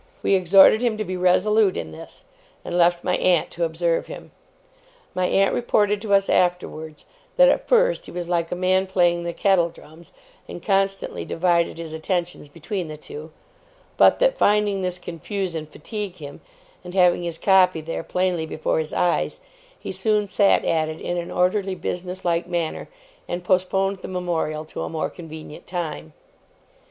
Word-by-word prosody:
We - - +2
exhorted 195 +4 +6
him 235 -3 0
to 215 - -2
be 185 - -4
resolute 190 +3 +3
in 80 - -5
this, 80 - -11 0.4
and 175 - -4
left 175 0 +3
my 180 - +1
aunt 175 -3 +2
to 170 - -3
observe 165 +1 -1
him. - - -10 0.8
My 185 0 0
aunt 195 +1 +2
reported 210 -4 +1
to 205 -2 +2
us, 195 0 +2
afterwards, 160 -4 -1 0.3
that, - - +7
at - - 0
first, - - +2
he - - -9
was 175 -1 -5
like 170 -1 -1
a - - -1
man 185 +1 +1
playing 175 -2 +2
the 170 - -2
kettle 180 -2 +2
drums, 165 0 -16 0.4
and 175 - -9
constantly 195 -1 0
divided 170 -1 0
his 165 -1 -6
attentions 170 -1 -3
between 170 +4 -5
the 155 0 -8
two; 155 +1 -10 0.7
but - - +5
that, - - +2
finding 205 -1 +2
this 180 -1 -2
confuse 180 +2 -5
and 155 -2 -5
fatigue 205 +4 -6
him, 145 -2 -10 0.4
and 180 +1 -9
having 180 -2 +4
his 170 -1 -4
copy 185 -3 +4
there, 160 +1 -5
plainly 180 -2 -1
before 155 0 -1
his 155 -1 -4
eyes, 175 - 0 0.4
he - - -6
soon 210 +3 +1
sat 200 0 +2
at 155 -1 +1
it 155 - -7
in 175 - -3
an 170 0 -4
orderly 190 +1 0
business 180 +1 -5
like 170 0 0
manner, 170 -3 -3 0.4
and 175 0 -4
postponed 190 +2 +1
the - - -9
Memorial 170 -4 -2
to - - -7
a - - -3
more 160 -1 -3
convenient 160 -3 -10
time. 155 - -5
180 Hz, 175 wpm, -23 LUFS, 165-195 Hz, 0.8 s, that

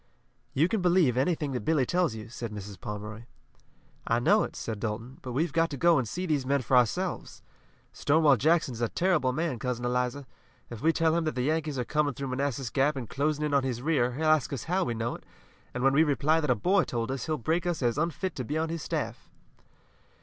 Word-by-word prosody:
"You 155 +5 +4
can 210 +1 -1
believe 175 -8 +3
anything 145 +2 0
that 125 - -2
Billy 155 -4 +2
tells 175 -4 +1
you," 110 -1 -8
said 115 -1 -6
Mrs. 100 -1 -8
Pomeroy. 105 +2 -6 0.8
"I 115 - +2
know 205 - +4
it," - - -4
said 110 -2 -5
Dalton, 115 +5 -5
"but 125 - -6
we've 155 +4 0
got 165 +1 +2
to 140 - -5
go 170 +5 +5
on 155 - +4
and 125 - -2
see 180 +1 -3
these 150 -6 0
men 135 0 0
for 130 - +1
ourselves. 170 - 0 0.5
Stonewall 150 -1 +4
Jackson 155 +2 +2
is 115 - -7
a 120 - +1
terrible 175 -8 +1
man, 150 -2 -2
Cousin 120 -1 -3
Eliza. 125 +3 -1 0.5
If 115 -2 -7
we 165 - +4
tell 165 0 +2
him 170 -1 0
that 155 - -2
the 125 - -1
Yankees 155 0 -1
are 125 - -1
coming 150 -2 0
through 135 +1 -4
Manassas 130 -2 -2
Gap 140 +3 +2
and 130 -4 -5
closing 150 +4 -1
in 150 - -2
on 140 - +4
his 125 -2 -3
rear, 130 -6 +1
he'll 155 +5 -2
ask 155 -3 +3
us 140 - -4
how 185 +3 0
we 120 - -2
know 115 +1 -2
it, - - -10 0.5
and 125 - -4
when 135 0 +4
we 155 +3 +5
reply 155 +1 +2
that 150 - -2
a - - +4
boy 185 0 +2
told 120 -2 -3
us 135 -3 -4
he'll 155 -1 0
break 165 +8 -1
us 170 -6 -1
as 120 +3 +1
unfit 170 +2 -2
to 130 - -2
be 150 +6 -3
on 160 +1 -1
his 165 -1 -4
staff." - - -4
140 Hz, 235 wpm, -28 LUFS, 125-160 Hz, 0.8 s, go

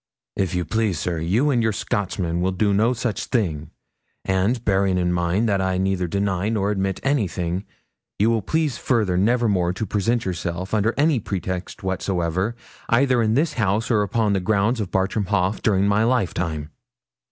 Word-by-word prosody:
'If 95 -3 -1
you 90 -1 -1
please, 110 0 0
sir, 85 0 -2
you 105 - +1
and 120 -3 +2
your 110 -1 +2
Scotchman 95 -4 -2
shall 95 +1 +1
do 100 +2 +1
no 110 +4 +3
such 115 -3 -2
thing; 80 - -1 0.6
and, 100 +6 0
bearing 95 -2 +2
in 90 -1 +1
mind 90 +6 +1
that 100 -3 +1
I 95 -1 0
neither 95 -1 0
deny 100 +2 -1
nor 105 -2 0
admit 95 -2 -1
anything, 95 - -1 0.5
you 110 +3 +3
will 115 -1 +1
please 155 +1 -1
further 110 -8 +1
never 120 +6 +2
more 90 -4 +1
to 105 +4 -3
present 115 +3 0
yourself, 90 +1 -4
under 110 +1 +1
any 145 -2 +3
pretext 95 -2 -5
whatsoever, 95 +2 -1 0.3
either 125 0 +3
in 110 0 +2
this 155 +4 +1
house 110 +1 0
or 105 -3 +2
on 110 -3 +2
the 95 - +1
grounds 110 +5 +1
of 100 - -3
Bartram 95 +2 0
Haugh, 95 +1 0
during 100 -2 +2
my 100 +2 +3
lifetime.' 90 -10 -1
100 Hz, 175 wpm, -22 LUFS, 90-115 Hz, 0.6 s, no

